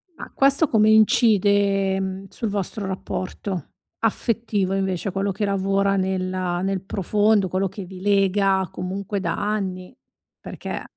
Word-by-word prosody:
Ma - - -10
questo 275 +3 +4
come 215 -3 +4
incide, 205 -3 +4
ehm, 190 0 -4
sul 225 - -4
vostro 200 +1 -3
rapporto, 190 0 -4 0.3
affettivo 220 -3 0
invece, 190 -1 -1
quello 195 +1 -1
che 205 +3 -2
lavora 195 0 +1
nella 185 -2 -1
nel 195 -1 -1
profondo, 205 +1 +1
quello 190 +2 0
che 195 +1 -8
vi 185 0 -11
lega 195 -1 +2
comunque 195 +2 -4
da 190 - -1
anni? 195 -1 -3 0.4
Perché - - -6
195 Hz, 130 wpm, -23 LUFS, 190-205 Hz, 0.4 s, questo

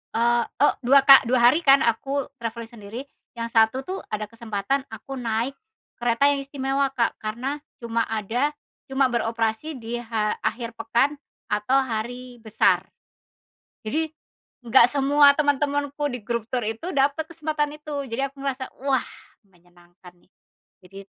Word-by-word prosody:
eee, 235 +1 +3 0.2
oh - - +5
2 270 +3 +6
ka 275 -1 +10
2 255 +1 +3
hari 305 - +1
kan 275 -1 +7
aku 270 +4 0
travelling 230 0 -5
sendiri, 225 +1 -8 0.3
yang 230 0 -3
1 225 +3 +3
tuh 375 +6 -5
ada 215 0 -3
kesempatan 230 +3 -2
aku 225 +5 -8
naik 235 +2 -2 0.4
kereta 240 +4 +3
yang 285 -1 +1
istimewa, 275 0 -1
Kak, 235 -3 0
karena 240 +7 -4 0.2
cuma 230 0 -1
ada 225 +7 -1 0.3
cuma 265 -1 +1
beroperasi 230 +5 -1
di 240 -1 -5
ha 225 -3 -2
akhir 235 -1 -3
pekan 270 +6 +1 0.3
atau 210 +5 +1
hari 245 +1 -5
besar. 220 -1 +1 0.9
Jadi 310 +8 -2 0.5
nggak 245 0 +5
semua 285 +1 +5
teman-temanku 285 0 0
di 245 - -5
grup 235 +1 -3
tour 250 - +1
itu 230 +12 -5
dapet 285 +3 +1
kesempatan 305 -2 -3
itu 295 -2 -4
jadi 265 +2 -2
aku 275 0 -12
ngerasa, 260 -1 -3 0.2
wah 270 -2 +2 0.4
menyenangkan 175 -2 -20
nih - - -30 0.6
jadi 195 +2 -12
245 Hz, 145 wpm, -24 LUFS, 225-280 Hz, 0.9 s, ka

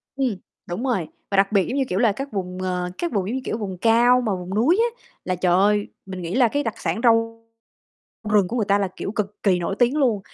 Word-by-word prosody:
Ừm, 255 -8 -1 0.3
đúng 180 +8 -3
rồi, 230 -12 0 0.2
và 195 - +1
đặc 195 +1 +4
biệt 200 -3 +2
giống 265 - -2
như, 275 - +2
kiểu 185 - -1
là, 230 -4 +4
các 275 +6 -6
vùng, 185 -2 -4
ờ, 180 -1 -2
các 345 - -2
vùng 195 -4 -1
giống 235 - -2
như, 265 - -2
kiểu, 220 - -3
vùng 190 -4 -5
cao 235 +4 +4
mà 225 -4 -1
vùng 180 +1 -6
núi 310 - +3
á, 475 +1 -2 0.2
là 185 - 0
trời 180 0 +1
ơi, 205 +2 +3 0.2
mình 190 -1 -7
nghĩ 175 +3 -4
là 250 -2 +5
cái 285 +5 -1
đặc 225 - -2
sản - - -2
rau 230 -1 +2 0.9
rừng 200 -4 +4
của 245 - -3
người 215 -4 0
ta, 200 - +4
là 200 -1 0
kiểu, 195 - -4
cực 210 -1 -4
kỳ 190 -3 +3
nổi 175 +3 -3
tiếng 245 +3 +3
luôn. 245 -9 +2
210 Hz, 260 wpm, -23 LUFS, 190-245 Hz, 0.9 s, là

